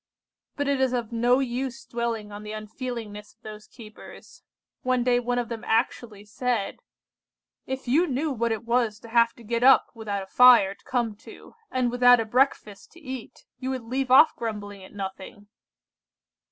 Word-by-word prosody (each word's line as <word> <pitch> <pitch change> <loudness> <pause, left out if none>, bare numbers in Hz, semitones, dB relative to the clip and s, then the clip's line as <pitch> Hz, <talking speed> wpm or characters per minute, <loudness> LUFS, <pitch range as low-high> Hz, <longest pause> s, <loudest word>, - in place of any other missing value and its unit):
"But 285 -1 -2
it 280 -1 +1
is 260 -1 +1
of 240 -3 -3
no 240 +2 +3
use 260 0 -3
dwelling 230 -3 -4
on 205 0 -8
the 210 0 -7
unfeelingness 215 -1 -7
of 225 - -51
those 215 0 -10
keepers. 215 -3 -14 0.4
One 255 -1 +1
day 245 0 +2
one 245 0 -2
of 240 -1 -1
them 230 0 -6
actually 225 -3 -1
said:— 225 -1 -2 0.9
"'If 265 0 -5
you 315 +9 +3
knew 285 +3 -1
what 235 -2 -1
it 225 +1 -3
was 235 -3 +1
to 230 - -12
have 230 0 +3
to 235 - -16
get 230 +1 -2
up 265 +1 +5
without 210 -4 -4
a 190 - -17
fire 245 -6 +7
to - - -28
come 240 -4 -1
to, - - -14 0.2
and 250 -2 0
without 245 0 +6
a 225 - -1
breakfast 220 -4 0
to 340 - -15
eat, 260 -6 -9
you 260 - -4
would 260 -2 -3
leave 260 +3 -3
off 275 +5 +6
grumbling 205 -3 -6
at 190 - -13
nothing. 195 +1 -8
235 Hz, 180 wpm, -25 LUFS, 215-255 Hz, 0.9 s, fire